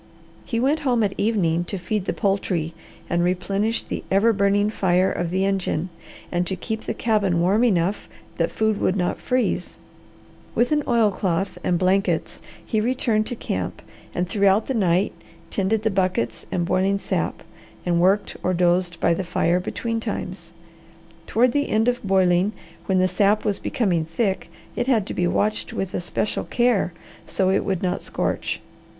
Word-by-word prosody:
He 230 - -1
went 280 +6 +2
home 245 -6 +1
at 200 -2 0
evening 180 -6 +1
to 195 - -4
feed 190 +2 -2
the - - 0
poultry 190 -5 -1 0.3
and 175 0 +1
replenish 195 +5 0
the - - -5
ever 210 +4 +4
burning 205 +1 +2
fire 185 -2 +2
of 175 -1 -2
the 190 +2 +1
engine 190 -3 -1 0.4
and 175 0 0
to 190 - -1
keep 220 +3 -4
the - - -2
cabin 205 -6 +1
warm 195 +7 +3
enough 195 -4 +1 0.3
that - - +1
food 220 -1 0
would 185 - +2
not 180 -2 -1
freeze. 255 0 -1 0.8
With 240 +3 +2
an 300 -1 +3
oilcloth 195 -5 +1
and 175 - +2
blankets 190 +3 +1 0.2
he 220 -2 0
returned 230 -2 +1
to 245 - -3
camp 95 - -4 0.3
and 180 +1 0
throughout 200 +2 +3
the 265 - -2
night 190 -4 +2 0.4
tended 205 +2 +1
the 220 - +2
buckets 185 -13 -1
and 175 - 0
boiling 190 +3 +2
sap, - - -2 0.4
and 170 -1 +2
worked 195 +3 +2
or 185 - 0
dozed 175 0 +1
by 170 - +3
the 180 - -2
fire 175 0 +1
between 230 +5 -3
times. 185 -6 -5 0.8
Toward 245 +3 +3
the 285 +2 0
end 220 +2 +2
of 245 0 +1
boiling, 190 0 +3 0.3
when 190 - +2
the 185 0 +4
sap 200 +3 +2
was 205 -2 0
becoming 190 - 0
thick, 190 +4 -1 0.3
it 245 - -1
had 225 -7 +3
to - - -5
be 175 - +1
watched 210 +4 0
with 190 -1 -3
especial 180 +4 -2
care 240 -7 +2 0.4
so 190 -1 +1
it 195 - +2
would 190 -2 -2
not 180 - 0
scorch. - - -2
195 Hz, 170 wpm, -23 LUFS, 180-220 Hz, 0.8 s, ever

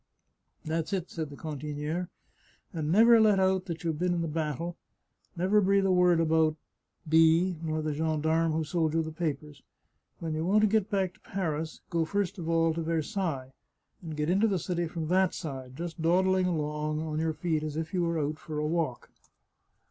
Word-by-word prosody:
" - - -43
That's 160 +3 -2
it," 185 -2 -2
said 160 -3 -4
the 140 - -10
cantiniere, 150 +3 -4 0.3
" - - -35
and 155 -2 -2
never 225 +4 +7
let 210 -3 +5
out 190 -1 +2
that 165 -1 -5
you've 160 -3 -2
been 180 0 +1
in 170 - -1
the - - -2
battle, 160 +2 -3 0.6
never 190 +4 +3
breathe 195 0 +3
a 190 - +3
word 180 -2 +4
about 160 -1 +3 0.5
B 165 +2 +4
nor 155 -1 -2
the 155 -1 -1
gendarme 160 +1 +1
who 160 +1 0
sold 160 0 0
you 165 - +2
the 160 - -5
papers. 150 -3 -4 0.6
When 165 -2 -4
you 155 +1 -2
want 200 +5 +3
to 215 - +5
get 210 -1 +1
back 190 -3 0
to - - -25
Paris, 160 -4 -3
go 165 -1 +2
first 195 +2 -2
of 165 -1 -4
all 165 -1 +3
to 165 - -3
Versailles, 160 -4 -2 0.5
and 160 -4 -7
get 150 0 0
into 195 +6 +3
the 195 -3 +1
city 175 0 -2
from 160 -1 -4
that 185 +1 +3
side, 130 -5 -6
just 170 +1 -6
dawdling 185 +2 +3
along 150 -2 -1
on 155 -1 -3
your 160 0 0
feet 160 -1 -1
as 155 0 -4
if 160 +2 -4
you 180 - +1
were 170 -1 0
out 150 +1 -2
for 155 -2 -6
a 150 - -1
walk. 155 -6 -2
165 Hz, 200 wpm, -29 LUFS, 155-180 Hz, 0.6 s, never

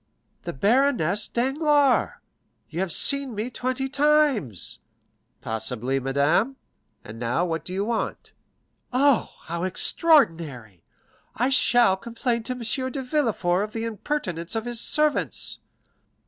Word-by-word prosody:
"The - - -4
baroness 210 - +1
Danglars; 280 +2 +2 0.6
you 165 - -4
have 190 -2 -1
seen 275 - +2
me 220 +5 -4
twenty 255 +2 -2
times." 280 - +1 0.6
"Possibly, 120 +4 -2
madame. 140 - +1 0.5
And 110 +1 -10
now, 120 +9 0
what 165 -2 -3
do - - -8
you 195 +2 -2
want?" 230 0 -3 0.6
"Oh, 270 0 +3
how 170 +1 -5
extraordinary! 165 - +1 0.5
I 250 +4 +1
shall 240 -6 +4
complain 235 +3 -2
to - - 0
M. 255 +2 -1
de 270 0 -4
Villefort 225 - 0
of 210 - -6
the 225 - -3
impertinence 210 - -4
of 225 0 -2
his 240 -1 0
servants." 300 -1 +1
230 Hz, 120 wpm, -24 LUFS, 170-265 Hz, 0.6 s, shall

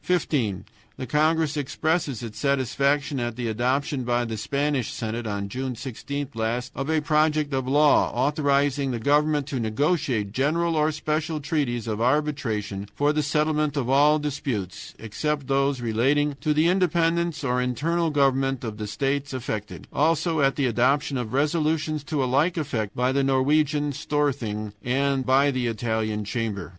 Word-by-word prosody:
"15. 120 - 0 0.3
The 130 - -4
congress 155 +3 +1
expresses 145 -2 -1
its 110 -2 -7
satisfaction 140 +2 +1
at 120 -1 -3
the 120 -1 -3
adoption 130 +5 0
by 120 0 0
the 115 -1 -4
Spanish 140 +3 -1
Senate 115 +1 -4
on 100 -1 -3
June 130 +4 -4
16 140 +3 -5
last 115 +3 -2
of 135 +2 -4
a 160 -1 +2
project 150 -1 +1
of 130 -1 -1
law 145 +2 +4
authorizing 140 +1 +1
the 125 - -2
government 145 +3 +2
to 135 -3 -3
negotiate 120 - 0
general 160 +7 +1
or 155 0 +2
special 155 +1 -2
treaties 140 -6 -1
of 110 -1 -3
arbitration 120 -8 -1
for 145 +1 +2
the 155 - +1
settlement 150 0 0
of 130 -2 -1
all 145 +3 +5
disputes 135 - -4
except 145 +6 -3
those 135 -1 +1
relating 135 +6 +1
to 155 - +1
the 155 +2 +3
independence 170 -3 +1
or 125 -2 +1
internal 160 +7 0
government 135 -3 +1
of 110 -3 -5
the 105 - -4
states 140 +4 -2
affected; 110 -4 -5
also 160 +1 +1
at 135 0 +3
the 140 - 0
adoption 135 +5 +1
of 120 -4 -3
resolutions 155 +1 0
to 150 -2 -1
a - - +1
like 145 +8 +1
effect 115 -9 -2
by 125 +1 +1
the 140 +1 +1
Norwegian 145 +2 +2
Storthing 125 -9 -2
and 135 +1 0
by 135 +2 +4
the 130 -2 -1
Italian 110 -2 -2
Chamber. 110 -3 -3
140 Hz, 160 wpm, -25 LUFS, 120-150 Hz, 0.3 s, all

